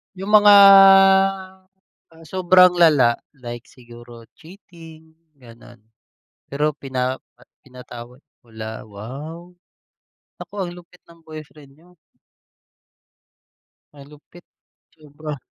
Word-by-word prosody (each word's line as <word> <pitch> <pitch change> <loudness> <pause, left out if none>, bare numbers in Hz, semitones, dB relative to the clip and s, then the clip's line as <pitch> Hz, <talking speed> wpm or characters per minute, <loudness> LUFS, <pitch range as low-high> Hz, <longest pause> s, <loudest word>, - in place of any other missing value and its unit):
Yung 195 +2 -8
mga 210 -1 +5 1.7
sobrang 180 +1 +2
lala 140 -8 +2 0.2
like 120 -3 -11
siguro 120 -1 -17 0.2
cheating, 165 -3 -17 0.3
gano'n. 120 -1 -18 0.7
Pero 150 +2 -3
pina 130 -1 -5 0.4
pinatawad 125 -1 -14 0.2
wala, 110 -1 -10
wow! 140 - -12 0.8
Naku, - - -14
ang 175 -2 -6
lupit 175 +1 -19
ng 170 0 -20
boyfriend 155 -3 -14
niyo. 175 +5 -26 2.0
Malupit, 150 +4 -18 0.5
sobra. 150 -1 -11
150 Hz, 80 wpm, -19 LUFS, 120-170 Hz, 2.0 s, mga